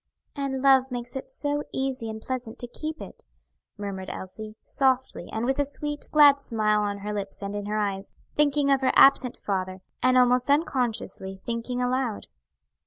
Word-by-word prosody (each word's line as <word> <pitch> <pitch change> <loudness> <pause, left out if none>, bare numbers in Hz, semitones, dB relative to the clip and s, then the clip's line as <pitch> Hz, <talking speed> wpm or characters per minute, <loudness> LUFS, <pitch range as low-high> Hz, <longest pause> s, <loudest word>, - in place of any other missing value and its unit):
"And 275 -2 -3
love 265 -1 +5
makes 245 0 -5
it 265 - -6
so 290 -12 -2
easy 265 -4 -2
and 220 0 -6
pleasant 245 -1 -5
to 245 - -6
keep 310 +6 -6
it," - - -10 0.5
murmured 195 -2 -5
Elsie, 215 +3 -8
softly, 260 -1 0
and 220 +2 -2
with 265 +2 0
a - - +4
sweet, 295 +1 -5
glad 290 -2 +7
smile 215 -5 +1
on 205 -1 -2
her 210 - -2
lips 200 -1 -5
and 200 +1 -4
in 205 0 -4
her 210 +1 -1
eyes, 200 -2 -2 0.2
thinking 290 -1 +3
of 275 0 +3
her 260 - +3
absent 265 -3 +6
father, 185 -1 -3 0.2
and 255 +1 +4
almost 250 +1 +4
unconsciously 240 - -1
thinking 240 +2 -2
aloud. 250 -3 -1
250 Hz, 175 wpm, -26 LUFS, 210-275 Hz, 0.5 s, glad